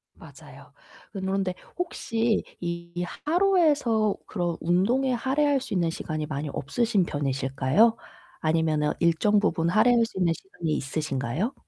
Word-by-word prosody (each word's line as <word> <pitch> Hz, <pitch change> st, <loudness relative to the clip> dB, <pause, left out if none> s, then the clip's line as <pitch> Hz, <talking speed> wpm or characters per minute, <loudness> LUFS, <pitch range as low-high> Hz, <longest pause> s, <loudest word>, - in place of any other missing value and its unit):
맞아요. -, -, -15 dB, 0.4 s
그런데 190 Hz, -1 st, -2 dB, 0.2 s
혹시 230 Hz, -10 st, -1 dB, 0.2 s
이 170 Hz, 0 st, -4 dB, 0.2 s
하루에서 300 Hz, -, +3 dB
그런 175 Hz, -4 st, -2 dB
운동에 230 Hz, +10 st, +2 dB
할애할 275 Hz, +3 st, +1 dB
수 265 Hz, -, -6 dB
있는 175 Hz, -3 st, +1 dB
시간이 155 Hz, -1 st, -4 dB
많이 145 Hz, 0 st, -4 dB
없으신 200 Hz, -, 0 dB
편이실까요? 135 Hz, -, +1 dB, 0.5 s
아니면은 155 Hz, -2 st, +1 dB
일정 175 Hz, +5 st, +3 dB
부분 170 Hz, -5 st, +1 dB
할애할 230 Hz, +4 st, +4 dB
수 225 Hz, -, -11 dB
있는 170 Hz, -3 st, +3 dB
시간이 170 Hz, -2 st, -6 dB
있으신가요? 140 Hz, -, -2 dB
185 Hz, 305 characters per minute, -26 LUFS, 155-230 Hz, 0.5 s, 할애할